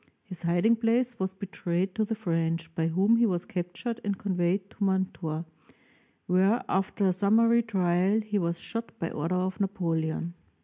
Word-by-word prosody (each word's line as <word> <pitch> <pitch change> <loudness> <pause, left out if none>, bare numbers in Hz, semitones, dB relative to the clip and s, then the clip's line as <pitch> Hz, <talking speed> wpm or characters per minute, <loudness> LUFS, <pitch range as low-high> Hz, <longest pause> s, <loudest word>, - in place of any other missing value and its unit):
His 185 -4 -8
hiding 175 +7 +3
place 235 +1 +1
was 190 0 -2
betrayed 185 -1 -2
to 220 - 0
the 225 +1 -2
French, 165 -4 -1
by 165 0 0
whom 195 +7 +3
he 235 0 +4
was 180 -3 -1
captured 185 +7 -4
and 200 -1 -1
conveyed 185 0 0
to 205 - -5
Mantua, 185 -4 -1 0.8
where, 190 +6 +3
after 195 +2 0
a 185 - +3
summary 225 +5 +4
trial, 190 -1 +2
he 210 -1 -1
was 170 -1 -1
shot 230 0 -5
by 165 - -3
order 165 +5 -2
of 185 +2 -1
Napoleon. 170 -4 -1
190 Hz, 165 wpm, -28 LUFS, 175-215 Hz, 0.8 s, he